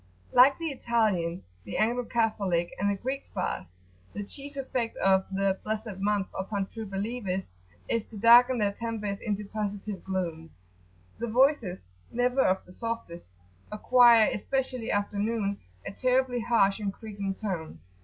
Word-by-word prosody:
Like 260 Hz, +3 st, +7 dB
the 330 Hz, -2 st, -3 dB
Italian, 215 Hz, -10 st, 0 dB, 0.2 s
the 100 Hz, -, -5 dB
Anglo 240 Hz, +3 st, +1 dB
Catholic, 200 Hz, -7 st, 0 dB
and 200 Hz, +1 st, +2 dB
the 200 Hz, -, +1 dB
Greek 265 Hz, +7 st, -4 dB
fasts, 90 Hz, -, -4 dB, 0.3 s
the 205 Hz, -, -4 dB
chief 280 Hz, +7 st, -10 dB
effect 255 Hz, -4 st, -3 dB
of 190 Hz, 0 st, +3 dB
the 195 Hz, 0 st, 0 dB
"blessed 215 Hz, -2 st, -4 dB
month" 205 Hz, 0 st, +1 dB
upon 195 Hz, +1 st, -2 dB
True 220 Hz, +2 st, -8 dB
Believers 195 Hz, -1 st, -3 dB, 0.4 s
is 230 Hz, -, 0 dB
to 215 Hz, -, -11 dB
darken 240 Hz, +4 st, +7 dB
their 205 Hz, -3 st, +1 dB
tempers 210 Hz, -2 st, -4 dB
into 210 Hz, -1 st, -3 dB
positive 205 Hz, -1 st, -4 dB
gloom. 170 Hz, -4 st, -3 dB, 0.7 s
[p.75]Their 235 Hz, -1 st, -3 dB
voices, 235 Hz, -, +2 dB, 0.2 s
never 250 Hz, +2 st, +2 dB
of 190 Hz, -5 st, +2 dB
the 180 Hz, -, -15 dB
softest, 230 Hz, -, -5 dB, 0.4 s
acquire, 235 Hz, +1 st, +6 dB
especially 255 Hz, +1 st, -2 dB
after 205 Hz, 0 st, -1 dB
noon, 205 Hz, -2 st, -1 dB, 0.3 s
a -, -, -4 dB
terribly 255 Hz, +2 st, +1 dB
harsh 225 Hz, -4 st, +2 dB
and 205 Hz, -2 st, -2 dB
creaking 200 Hz, -2 st, -5 dB
tone. 175 Hz, -, -5 dB
210 Hz, 145 wpm, -28 LUFS, 195-235 Hz, 0.7 s, Like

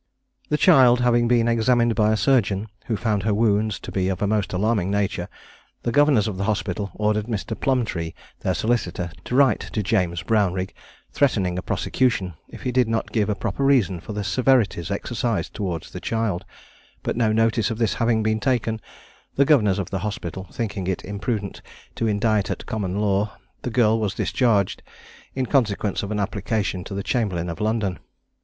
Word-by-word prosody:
The 150 Hz, -, +2 dB
child 130 Hz, -8 st, +6 dB
having 120 Hz, -1 st, +3 dB
been 120 Hz, -1 st, +3 dB
examined 120 Hz, 0 st, +3 dB
by 110 Hz, -1 st, +3 dB
a 110 Hz, -, +2 dB
surgeon, 105 Hz, -6 st, +2 dB, 0.2 s
(who 110 Hz, -, 0 dB
found 105 Hz, -3 st, 0 dB
her 105 Hz, +1 st, +1 dB
wounds 105 Hz, -1 st, +1 dB
to -, -, -7 dB
be 95 Hz, -1 st, 0 dB
of 95 Hz, -2 st, -2 dB
a -, -, +1 dB
most 105 Hz, -1 st, 0 dB
alarming 100 Hz, 0 st, +1 dB
nature,) 100 Hz, -3 st, -1 dB, 0.5 s
the 120 Hz, -, 0 dB
governors 140 Hz, -5 st, +4 dB
of 100 Hz, -4 st, -4 dB
the 100 Hz, -, -1 dB
hospital 100 Hz, -2 st, -1 dB
ordered 105 Hz, 0 st, 0 dB
Mr. 110 Hz, -1 st, -3 dB
Plumbtree, 110 Hz, -13 st, -1 dB, 0.3 s
their -, -, -1 dB
solicitor, 90 Hz, -7 st, -1 dB
to 125 Hz, -, -2 dB
write 135 Hz, -1 st, +5 dB
to 105 Hz, -, -3 dB
James 90 Hz, -5 st, 0 dB
Brownrigg, 95 Hz, -3 st, 0 dB, 0.4 s
threatening 100 Hz, -11 st, +1 dB
a 90 Hz, -, -2 dB
prosecution, 95 Hz, -1 st, 0 dB, 0.2 s
if -, -, -11 dB
he 125 Hz, -, -1 dB
did 125 Hz, -1 st, +3 dB
not 115 Hz, 0 st, -1 dB
give 110 Hz, -2 st, +1 dB
a 105 Hz, -, +1 dB
proper 140 Hz, -, -3 dB
reason 120 Hz, -10 st, +3 dB
for 105 Hz, -, -8 dB
the 105 Hz, 0 st, -3 dB
severities 110 Hz, -5 st, +2 dB
exercised 100 Hz, -3 st, -2 dB
toward 90 Hz, -6 st, -3 dB
the -, -, -9 dB
child; 110 Hz, -5 st, -1 dB, 0.6 s
but -, -, -1 dB
no 115 Hz, -2 st, +2 dB
notice 115 Hz, +1 st, +2 dB
of 115 Hz, -, -3 dB
this 115 Hz, -2 st, +1 dB
having 115 Hz, -1 st, +1 dB
been 110 Hz, 0 st, +1 dB
taken, 110 Hz, -2 st, 0 dB, 0.5 s
the 140 Hz, -, +4 dB
governors 110 Hz, -11 st, +4 dB
of 95 Hz, -3 st, -4 dB
the 95 Hz, -, -1 dB
hospital 100 Hz, -2 st, -5 dB
thinking 105 Hz, -5 st, -3 dB
it 95 Hz, -, -2 dB
imprudent 100 Hz, 0 st, -3 dB, 0.3 s
to 115 Hz, -, -1 dB
indict 105 Hz, -1 st, +1 dB
at -, -, -4 dB
common 100 Hz, -3 st, -3 dB
law, 100 Hz, 0 st, 0 dB, 0.2 s
the -, -, -3 dB
girl 115 Hz, -2 st, +3 dB
was 105 Hz, -1 st, -1 dB
discharged, 105 Hz, -7 st, +1 dB, 0.5 s
in 130 Hz, -1 st, 0 dB
consequence 110 Hz, -6 st, +1 dB
of 100 Hz, -, -5 dB
an 105 Hz, -1 st, -2 dB
application 100 Hz, -1 st, -1 dB
to 100 Hz, -, -7 dB
the 100 Hz, -, -3 dB
chamberlain 95 Hz, -8 st, -1 dB
of 85 Hz, +2 st, -6 dB
London. 105 Hz, -4 st, 0 dB
105 Hz, 185 wpm, -23 LUFS, 100-115 Hz, 0.6 s, child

